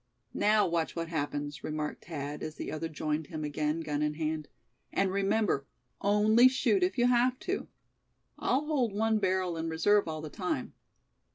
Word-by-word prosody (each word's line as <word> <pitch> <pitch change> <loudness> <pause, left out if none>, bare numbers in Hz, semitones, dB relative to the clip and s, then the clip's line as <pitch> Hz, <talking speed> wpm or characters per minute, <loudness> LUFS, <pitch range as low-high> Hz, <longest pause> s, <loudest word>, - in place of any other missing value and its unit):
"Now 210 0 +4
watch 165 -1 -1
what 165 -1 -3
happens!" 145 -2 -3
remarked 155 -1 -4
Thad, 145 -3 -5
as 155 0 -5
the - - -5
other 160 +1 -3
joined 155 0 -2
him 155 -1 -5
again, 150 +2 -1
gun 150 -2 -2
in 150 0 0
hand; 155 -1 -2 0.4
"and 195 -1 +1
remember, 195 -7 +1 0.3
only 215 +4 +5
shoot 265 +9 +2
if 360 -5 +1
you 240 - +4
have 250 +1 +3
to. 385 +2 -2 0.7
I'll 275 +4 +1
hold 265 -9 +1
one 220 +1 +2
barrel 185 -3 0
in 165 0 -2
reserve 200 +5 +3
all 155 -1 -4
the 155 -1 -7
time. 180 -9 -3
165 Hz, 170 wpm, -30 LUFS, 155-215 Hz, 0.7 s, only